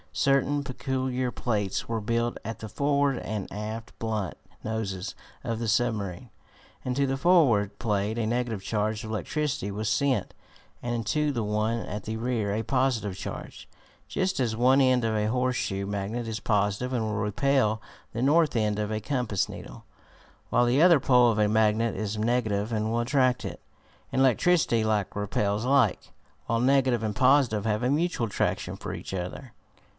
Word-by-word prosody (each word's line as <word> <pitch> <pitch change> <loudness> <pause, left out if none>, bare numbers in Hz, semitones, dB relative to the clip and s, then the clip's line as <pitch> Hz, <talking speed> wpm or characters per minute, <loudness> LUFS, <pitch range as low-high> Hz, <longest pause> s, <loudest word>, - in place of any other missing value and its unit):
Certain 140 +1 +2
peculiar 130 -1 -2
plates 105 -6 -2
were 115 -1 -2
built 115 +2 -1
at 115 - -5
the 110 - -6
forward 140 +2 +1
and 105 -3 -4
aft 110 +2 -6
blunt 110 -5 -2 0.3
noses 105 -3 -3 0.3
of 115 -1 -2
the 115 -2 -1
submarine. 110 -2 -1 0.5
Into 125 +2 0
the 135 - 0
forward 135 - +3
plate 105 -1 -1
a 115 - 0
negative 120 -2 -1
charge 110 +2 -1
of 110 - -6
electricity 145 0 -2
was 105 +2 -3
sent, 130 -3 +1 0.5
and 120 0 -2
into 145 +7 0
the 120 -5 -2
one 105 +2 0
at 105 -1 -5
the 110 0 -4
rear 115 -4 -1
a 110 +2 -1
positive 120 -5 0
charge, - - -8 0.4
just 185 -3 -1
as 115 -4 0
one 130 +4 +4
end 130 -2 +3
of 110 -1 0
a 105 0 +1
horseshoe 125 -5 -1
magnet 100 +4 -3
is 110 -1 -4
positive 105 +3 0
and 120 -3 0
will 110 - -2
repel 110 +1 +1 0.3
the 115 +2 -2
north 150 +1 +3
end 105 -2 +1
of 105 0 -2
a 110 - -1
compass 120 -5 -1
needle, - - -10 0.6
while 120 - +3
the 125 +5 +3
other 170 -3 +7
pole 125 -2 +5
of 110 - -1
a 105 - +4
magnet 110 +1 +2
is 105 +1 -3
negative 110 -1 0
and 110 0 0
will 115 - +1
attract 130 0 +2
it. - - -6 0.5
In 130 - +1
electricity 135 -2 +3
like 105 -3 0
repels 105 +1 -1
like, 130 -5 +2 0.4
while 115 - +1
negative 130 -2 +3
and 105 -2 -2
positive 130 -5 +3
have 110 +1 0
a 125 - +2
mutual 155 -5 0
attraction 105 - -1
for - - -6
each - - -7
other. 95 +7 -5
115 Hz, 170 wpm, -27 LUFS, 105-130 Hz, 0.6 s, other